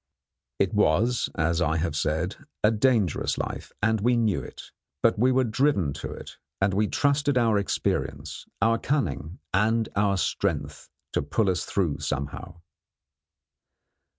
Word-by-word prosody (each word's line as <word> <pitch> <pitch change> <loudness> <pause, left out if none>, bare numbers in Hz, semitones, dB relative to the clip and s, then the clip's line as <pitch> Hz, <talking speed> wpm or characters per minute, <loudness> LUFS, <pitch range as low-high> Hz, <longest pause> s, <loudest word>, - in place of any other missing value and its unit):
It - - +1
was, 115 +10 +2
as 85 +2 +1
I 80 -1 +1
have 80 -1 -1
said, 80 +5 -1 0.3
a 105 - +5
dangerous 110 - +1
life, - - -5
and 110 -1 +2
we 120 +2 +3
knew 110 -6 +1
it; - - -11 0.3
but 115 -2 +3
we 125 +3 +4
were 130 0 +3
driven 110 - +1
to - - -5
it, - - -10 0.2
and 95 0 +2
we 105 +2 +2
trusted 145 +1 +1
to 125 - +4
our 110 -3 +3
experience, 100 - -2 0.2
our 115 0 +3
cunning, 95 - -2 0.2
and 110 +3 +2
our 100 -1 +2
strength, - - -2 0.2
to - - +1
pull 95 +8 +1
us 85 -1 -2
through 85 -8 -1
somehow. 80 +5 -4
105 Hz, 150 wpm, -26 LUFS, 85-115 Hz, 0.3 s, a